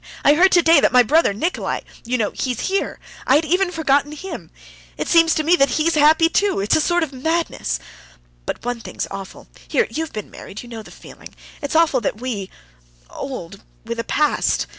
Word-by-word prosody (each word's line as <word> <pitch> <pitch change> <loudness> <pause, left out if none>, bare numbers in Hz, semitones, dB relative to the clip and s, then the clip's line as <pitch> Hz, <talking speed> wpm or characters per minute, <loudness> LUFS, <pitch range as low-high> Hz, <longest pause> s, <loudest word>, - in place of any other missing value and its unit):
I 290 - +7
heard 370 +5 +5
today 335 -3 +6
that - - +3
my 250 -1 +6
brother 310 +2 +3
Nikolay... 320 - -2 0.2
you 250 +2 0
know, 215 -3 0
he's 250 -4 -3
here... 390 +1 -2 0.3
I 265 - +5
had 310 +2 +3
even 365 +4 +1
forgotten 295 -3 +1
him. 375 +6 -8 0.5
It - - -3
seems 330 -1 +4
to 310 - 0
me 335 +3 +4
that 275 -3 +4
he's 325 +2 +2
happy 310 +2 +5
too. 400 - +1
It's 200 +2 +2
a 315 - +3
sort 345 +2 +1
of 295 -3 -5
madness. 275 - -2 0.7
But - - -4
one 245 -1 -2
thing's - - -5
awful.... 195 -1 -8 0.2
Here, - - +2
you've 320 0 -3
been 215 -2 -7
married, 205 - -9
you 240 - -12
know 225 -2 -7
the - - -14
feeling... - - -13 0.3
it's 285 +1 -4
awful 315 -6 +3
that 210 0 -2
we—old—with 190 - -8
a - - -1
past 300 +5 +1
285 Hz, 190 wpm, -20 LUFS, 225-330 Hz, 0.7 s, I